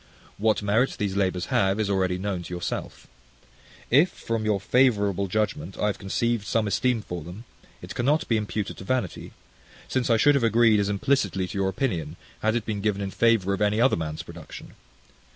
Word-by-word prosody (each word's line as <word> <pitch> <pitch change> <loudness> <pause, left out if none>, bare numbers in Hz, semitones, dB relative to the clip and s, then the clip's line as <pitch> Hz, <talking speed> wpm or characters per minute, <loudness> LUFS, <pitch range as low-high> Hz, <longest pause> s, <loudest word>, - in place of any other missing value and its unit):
What 110 0 +2
merit 110 +6 +2
these 100 -2 -2
labours 95 -3 0
have 95 +2 +2
is 110 - +1
already 95 -2 +1
known 95 -1 -3
to 90 - -8
yourself. 90 - -5 0.9
If, 150 +9 +6
from 115 -1 -4
your 105 -2 +1
favourable 100 -4 +2
judgment, 100 -3 -2
I - - 0
have 105 - -1
conceived 115 +2 -1
some 110 +1 +1
esteem 115 +3 0
for 90 -4 -6
them, 90 +8 -9 0.4
it - - -7
cannot 145 +6 +1
be 115 - +2
imputed 105 -1 -3
to - - -9
vanity; 120 -3 -2 0.6
since 130 -2 -1
I 115 - +4
should 145 +6 +5
have 140 -3 +1
agreed 115 -1 +4
as 100 0 0
implicitly 100 -4 0
to 100 - -8
your 95 -1 +1
opinion, 90 - -2 0.3
had 110 +1 +1
it 115 -2 -1
been 105 -2 -3
given 105 -1 0
in 95 - -4
favour 115 -4 +2
of 100 - -3
any 105 +1 +2
other 130 +3 +4
man's 80 0 -4
production. 85 -2 -11
105 Hz, 190 wpm, -25 LUFS, 95-115 Hz, 0.9 s, If